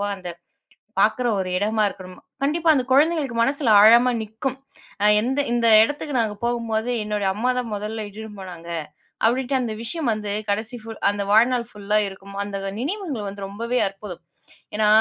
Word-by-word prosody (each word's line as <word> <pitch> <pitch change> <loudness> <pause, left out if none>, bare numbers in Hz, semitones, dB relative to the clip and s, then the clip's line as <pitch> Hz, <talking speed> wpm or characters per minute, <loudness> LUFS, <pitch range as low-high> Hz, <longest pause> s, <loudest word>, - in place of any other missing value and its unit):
போக 205 - -1
அந்த 180 -2 -7 0.7
பாக்குற, 220 +5 +2
ஒரு 185 - -3
இடமா 215 +3 +1
இருக்கணும். 185 -2 -11 0.2
கண்டிப்பா 320 +4 +1
அந்த 255 -3 +1
குழந்தைங்களுக்கு 290 -3 +2
மனசுல 270 0 +1
ஆழாமா 235 +4 +7
நிக்கும். 225 +5 -4 0.5
அ, - - +3 0.2
எந்த 260 +5 -1
இந்த 240 -1 +1 0.2
இடத்துக்கு 290 +3 -2
நாங்க 215 -2 -1
போகும்போது, 235 -1 -1
"என்னுடைய 210 -2 -1
அம்மாதான் 250 +1 -1
மொதல்ல 215 +1 -4
இட்டுனு 220 +2 -9
போனாங்க", 175 -3 -9 0.6
அப்டீன்டு 260 +3 +1
அந்த 230 -3 -2
விஷயம் 285 0 -1
வந்து 210 -1 -3 0.2
கடைசி 220 +4 -2
ஃபுல் 225 0 -9
அந்த 205 0 -3
வாழ்நாள் 235 +3 +4
ஃபுல்லா 210 +1 0
இருக்கும். 195 +1 -11
அந்த 200 -1 -4 0.2
நினைவுங்க 330 - -3
வந்து 195 0 -6
ரொம்பவே 235 +4 -2
அற்புதம். 195 -2 -10 0.5
ஏன்னா 215 0 +2
220 Hz, 155 wpm, -23 LUFS, 205-250 Hz, 0.7 s, ஆழாமா